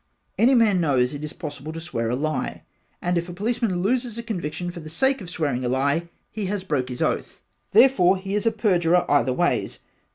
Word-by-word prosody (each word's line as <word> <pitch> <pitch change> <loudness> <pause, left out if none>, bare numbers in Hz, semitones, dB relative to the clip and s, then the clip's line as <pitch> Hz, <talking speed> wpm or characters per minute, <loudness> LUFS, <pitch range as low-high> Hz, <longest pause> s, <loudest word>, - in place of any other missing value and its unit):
Any 255 +3 +5
man 210 -6 +4
knows 130 -5 +2
it 145 +1 -6
is 150 - -4
possible 150 -3 -7
to 165 - -5
swear 115 -9 -3
a 120 - 0
lie 155 +3 -2 0.4
and 175 0 +1
if 170 +1 -6
a - - -6
policeman 210 -2 -1
looses 240 +1 0
a 235 - -4
conviction 175 -5 -4
for 175 - -9
the 155 -1 -9
sake 265 - +1
of 180 - -8
swearing 145 -7 -1
a 125 - 0
lie 140 +6 0 0.2
he 210 -3 -3
has 200 -1 -2
broke 140 -8 -1
his 125 - -2
oath - - -2 0.3
therefore 205 -5 +5
he 195 +1 -5
is 210 +2 0
a - - +4
perjurer 180 -6 +2
either 135 -3 +3
ways. 125 - 0
175 Hz, 215 wpm, -24 LUFS, 150-210 Hz, 0.4 s, Any